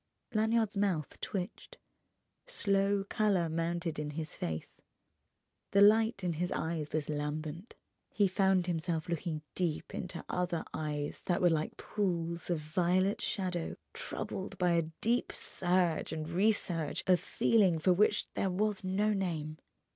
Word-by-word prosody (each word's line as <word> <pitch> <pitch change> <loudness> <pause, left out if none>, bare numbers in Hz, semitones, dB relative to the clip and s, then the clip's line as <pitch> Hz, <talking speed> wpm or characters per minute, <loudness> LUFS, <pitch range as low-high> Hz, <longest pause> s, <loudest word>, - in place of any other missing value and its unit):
Lanyard's 220 -1 +2
mouth 190 -7 0
twitched, 185 -3 -5 0.7
slow 200 - +2
colour 200 -7 +2
mounted 165 0 -1
in 150 -1 -2
his 160 -1 -4
face, 80 -1 -5 0.9
the 200 - +6
light 220 0 +5
in 175 -2 0
his 175 +3 -2
eyes 160 -2 -2
was 155 -2 -1
lambent. 155 +5 -4 0.3
He 205 -2 +3
found 190 -1 +3
himself 165 -1 -1
looking 165 -2 -2
deep 170 -4 -2
into 180 -2 -5
other 180 -2 -1
eyes 150 -2 -3
that 175 - +2
were 175 -1 +4
like 155 -1 -1
pools 170 -4 -2
of 175 - +2
violet 180 +5 +1
shadow 180 -4 -2 0.2
troubled 190 +1 -5
by 180 -1 +3
a 165 -2 +2
deep 240 +2 +1
surge 175 -2 +1
and 155 -1 -3
resurge 175 -2 0
of 180 -1 +5
feeling 195 -7 +3
for 180 +4 +4
which 210 +4 +3
there 195 - 0
was 205 +2 0
no 200 +3 +1
name. 160 -6 -2
180 Hz, 140 wpm, -32 LUFS, 160-195 Hz, 0.9 s, the